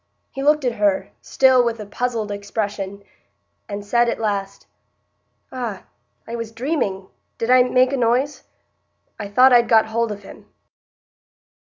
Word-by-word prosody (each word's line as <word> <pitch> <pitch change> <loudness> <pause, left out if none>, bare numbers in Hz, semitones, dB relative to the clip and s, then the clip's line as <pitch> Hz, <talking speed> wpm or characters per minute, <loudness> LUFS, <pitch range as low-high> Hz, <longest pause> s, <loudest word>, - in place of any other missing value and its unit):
He 270 - -6
looked 300 0 +2
at 240 -2 -1
her, 205 -2 +1
still 260 -2 +4
with 230 -1 -2
a 210 - -6
puzzled 225 0 -3
expression, 200 -1 -4 0.7
and 200 0 -6
said 235 +3 +2
at - - -3
last: 200 -3 -3 0.9
"Ah!—I 230 -1 -8
was 230 -1 -5
dreaming—did 230 -3 -4
I 255 0 +7
make 255 +1 +2
a - - 0
noise?—I 250 -3 -4
thought 250 +6 +5
I'd 235 -1 +5
got 225 -1 +5
hold 230 0 -1
of 205 -1 -7
him." - - -14
230 Hz, 135 wpm, -21 LUFS, 205-250 Hz, 0.9 s, I